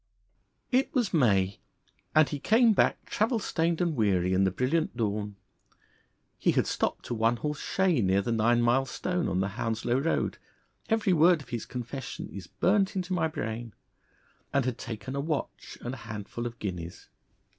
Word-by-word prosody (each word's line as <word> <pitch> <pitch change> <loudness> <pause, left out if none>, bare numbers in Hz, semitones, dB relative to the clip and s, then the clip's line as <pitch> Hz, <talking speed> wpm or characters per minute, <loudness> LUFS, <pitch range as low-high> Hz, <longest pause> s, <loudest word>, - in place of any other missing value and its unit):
It 260 +2 +2
was 240 -7 +1
May, 100 - +3 0.6
and 155 -2 +6
he 145 - -4
came 225 - +4
back - - +2
travel 225 +3 +1
stained 170 -4 0
and 170 -3 +1
weary 95 -5 +2
in 95 +1 +3
the - - +3
brilliant 130 - 0
dawn. 105 -2 -2 1.0
He - - +3
had - - +2
stopped - - -2
a - - -1
one 115 +1 +2
horse 150 +5 -3
shay 185 -8 +1
near 95 0 +2
the 120 - -2
nine 120 +1 +3
mile 130 +3 +3
stone 180 +3 -2
on 90 - 0
the 100 - 0
Hounslow 120 +2 0
Road 160 +4 0 0.5
every 220 -4 +2
word 170 +1 +5
of - - -20
his 120 -3 -4
confession 125 +1 -6
is 100 - -8
burnt 195 +1 +1
into 185 0 -2
my 175 -3 +2
brain 120 -7 -5 0.8
and 140 -2 +1
had 125 -2 -2
taken 115 +2 -6
a 140 - -1
watch 150 0 -4
and 120 - -4
a - - -6
handful 115 +1 -5
of 115 0 -8
guineas. 90 -4 -6
125 Hz, 175 wpm, -28 LUFS, 110-165 Hz, 1.0 s, and